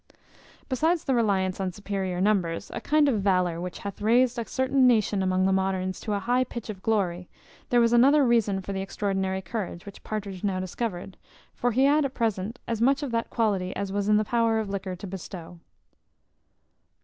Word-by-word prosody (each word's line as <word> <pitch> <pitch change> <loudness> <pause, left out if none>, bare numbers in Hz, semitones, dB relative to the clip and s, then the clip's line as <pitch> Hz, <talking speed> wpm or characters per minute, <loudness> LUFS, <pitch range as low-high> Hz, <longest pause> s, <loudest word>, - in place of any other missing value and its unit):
Besides 320 +6 +1
the 270 - 0
reliance 195 -6 +1
on 190 -1 -1
superior 195 -2 -3
numbers, 185 -4 0
a - - -4
kind 300 0 +3
of 225 -7 +1
valour 180 -3 +1
which 180 0 -5
hath 200 0 -7
raised 240 +3 +3
a 230 - -4
certain 260 0 +2
nation 215 -4 +2
among 185 0 +1
the 190 - +3
moderns 190 -1 -1
to 210 - -3
a 200 - 0
high 245 +4 +1
pitch 235 -3 -6
of 190 -3 -11
glory, 185 -5 -1 0.4
there 245 - +4
was 235 0 +3
another 275 +4 +5
reason 215 -5 +2
for 200 - -5
the 190 - -2
extraordinary 190 -1 -2
courage 185 -3 -5
which 200 - -11
Partridge 200 -3 -5
now 195 -2 0
discovered; 185 0 -4 0.4
for 245 - 0
he 255 +4 +2
had 295 +2 +4
at 270 -1 -3
present 220 -1 -1
as 230 -1 -2
much 275 +4 +3
of 275 - -3
that 230 0 -1
quality 195 -5 0
as 200 -1 -3
was 200 +1 -1
in 210 - +5
the 215 - +1
power 230 0 +2
of 220 -2 -2
liquor 190 -2 -4
to 185 - -9
bestow. 180 -2 -8
205 Hz, 195 wpm, -26 LUFS, 190-235 Hz, 0.4 s, another